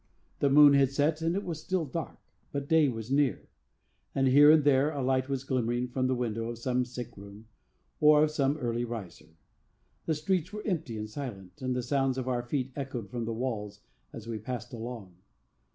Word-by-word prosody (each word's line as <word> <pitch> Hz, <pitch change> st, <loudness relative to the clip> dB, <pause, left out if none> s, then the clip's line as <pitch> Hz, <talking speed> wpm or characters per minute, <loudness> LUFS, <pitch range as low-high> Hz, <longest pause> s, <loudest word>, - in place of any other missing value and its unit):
The 140 Hz, -, +3 dB
moon 145 Hz, +1 st, +8 dB
had 140 Hz, -2 st, +4 dB
set 150 Hz, +3 st, 0 dB
and 165 Hz, +2 st, 0 dB
it 200 Hz, -, -1 dB
was 160 Hz, -3 st, -5 dB
still 185 Hz, -2 st, -1 dB
dark, 160 Hz, +3 st, -5 dB, 0.3 s
but 140 Hz, 0 st, -4 dB
day 160 Hz, -1 st, +4 dB
was 115 Hz, 0 st, -6 dB
near; 140 Hz, -6 st, +1 dB, 0.7 s
and 135 Hz, -1 st, +2 dB
here 145 Hz, +3 st, +7 dB
and 155 Hz, -1 st, +6 dB
there 140 Hz, 0 st, +4 dB
a 145 Hz, -3 st, -3 dB
light 130 Hz, +1 st, +1 dB
was 135 Hz, -1 st, -2 dB
glimmering 125 Hz, -2 st, -1 dB
from 130 Hz, +1 st, 0 dB
the 130 Hz, -, +1 dB
window 115 Hz, -2 st, -2 dB
of 120 Hz, -, -5 dB
some 125 Hz, +1 st, 0 dB
sick 125 Hz, -1 st, -8 dB
room, 100 Hz, +2 st, -12 dB, 0.5 s
or 150 Hz, 0 st, +6 dB
of 155 Hz, -, +1 dB
some 140 Hz, -1 st, +1 dB
early 120 Hz, -3 st, -2 dB
riser. 95 Hz, -9 st, -8 dB, 0.7 s
The 160 Hz, -, +1 dB
streets 175 Hz, +3 st, -1 dB
were 210 Hz, 0 st, -7 dB
empty 160 Hz, -, -2 dB
and 105 Hz, 0 st, -4 dB
silent, 110 Hz, -2 st, -8 dB
and 130 Hz, -1 st, -1 dB
the 125 Hz, -, -2 dB
sounds 135 Hz, 0 st, 0 dB
of 130 Hz, -1 st, -3 dB
our 125 Hz, -1 st, 0 dB
feet 130 Hz, +1 st, -3 dB
echoed 125 Hz, -7 st, -5 dB
from 120 Hz, -2 st, -3 dB
the 115 Hz, -, -3 dB
walls 105 Hz, -4 st, -4 dB, 0.3 s
as 115 Hz, -, -9 dB
we 115 Hz, -2 st, -4 dB
passed 125 Hz, +4 st, -6 dB
along. 115 Hz, -6 st, -7 dB
130 Hz, 200 wpm, -29 LUFS, 115-145 Hz, 0.7 s, moon